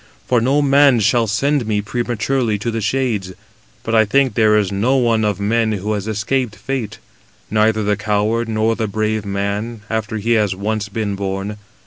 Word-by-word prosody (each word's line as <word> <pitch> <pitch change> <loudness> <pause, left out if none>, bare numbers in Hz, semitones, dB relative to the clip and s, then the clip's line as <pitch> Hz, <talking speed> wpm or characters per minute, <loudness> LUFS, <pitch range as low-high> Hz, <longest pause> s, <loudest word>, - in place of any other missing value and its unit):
For 125 -2 +2
no 140 +5 +2
man 140 -2 +5
shall 115 +2 +2
send 130 +4 0
me 105 -1 +1
prematurely 120 +1 -1
to 115 +3 -3
the 115 0 -3
shades. 110 -5 -1 0.5
But 115 - -3
I 110 -1 +6
think 130 +5 +2
there 110 -2 +4
is 100 -2 0
no 110 +7 +1
one 115 -3 +2
of 105 -2 0
men 110 +2 +1
who 105 +1 -2
has 105 0 -3
escaped 110 +2 -1
fate, 130 -5 -4 0.5
neither 110 0 +2
the 105 0 +1
coward 110 +2 0
nor 110 +1 +1
the 110 -1 -2
brave 110 0 -1
man, 100 +3 -3
after 110 0 -2
he 110 +3 -2
has 105 -4 +2
once 105 +1 -2
been 105 0 -2
born. 100 +1 -4
110 Hz, 180 wpm, -18 LUFS, 105-120 Hz, 0.5 s, I